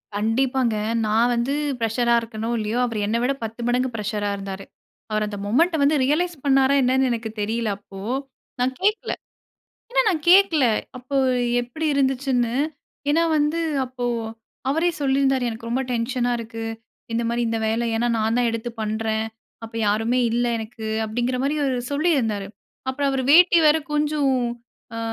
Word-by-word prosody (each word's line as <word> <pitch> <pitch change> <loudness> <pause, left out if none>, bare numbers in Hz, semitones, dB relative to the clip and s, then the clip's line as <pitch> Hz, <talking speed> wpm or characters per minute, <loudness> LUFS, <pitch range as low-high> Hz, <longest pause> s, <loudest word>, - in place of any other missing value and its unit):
கண்டிப்பாங்க. 240 +2 +1 0.3
நான் 225 +3 +3
வந்து 240 +4 0 0.2
ஃப்ரஷரா 235 +1 +1
இருக்கனோ 225 0 -5
இல்லையோ 215 +2 -2
அவரு 230 -3 -3
என்னை 230 +2 +1
விட 275 - +2
10 225 +2 -6
மடங்கு 250 +1 +1
ஃப்ரஷரா 210 -1 -2
இருந்தாரு. 195 0 -6 0.5
அவரு 215 0 +1
அந்த 205 -1 -6
மொமெண்ட்ட 325 - +2
வந்து 295 +2 +4
ரியலைஸ் 340 +5 +1
பண்ணாரா 270 0 +4
என்னன்னு 260 0 +2
எனக்கு 230 -1 -3
தெரியல. 220 +1 -1
அப்போ 195 -1 -12 0.6
நான் 255 +1 +1
கேட்கல. 420 +3 +1 0.8
ஏன்னா - - +3
நான் 320 -6 0
கேட்கல 360 -6 +6 0.3
அப்போ 255 +2 -4 0.4
எப்டி 245 +7 -4
இருந்துச்சுன்னு. 265 -3 +1 0.6
ஏனா 330 +3 +3 0.2
வந்து 300 +3 +1 0.2
அப்போ 250 -1 -5 0.6
அவரே 325 +5 +2
சொல்லியிருந்தாரு 270 -2 +2
"எனக்கு 230 +1 -7
ரொம்ப 255 +3 0
டென்ஷனா 245 +1 0
இருக்கு. 225 0 -6 0.5
இந்த 235 +1 0
மாரி 235 +1 0
இந்த 225 0 -1
வேலை. 225 +2 0
ஏனா, 235 +2 +1
நான் 220 +1 +1
தான் 245 - +2
எடுத்து 230 +1 -4
பண்றேன் 220 0 -1 0.4
அப்போ 225 0 -9
யாருமே 225 +4 +1
இல்ல 240 +1 +1
எனக்கு" 220 0 -7 0.2
அப்டிங்கிற 240 +3 -1
மாரி 280 +2 +1
அவரு 265 -3 0
சொல்லியிருந்தாரு. 270 - +1 0.4
அப்புறம் 280 +2 0
அவரு 270 -1 -1
வேட்டி 345 +1 +7
வேற 305 +1 +6 0.2
கொஞ்சம் 295 -2 +1 0.6
அ - - -4
245 Hz, 150 wpm, -23 LUFS, 225-275 Hz, 0.8 s, வேட்டி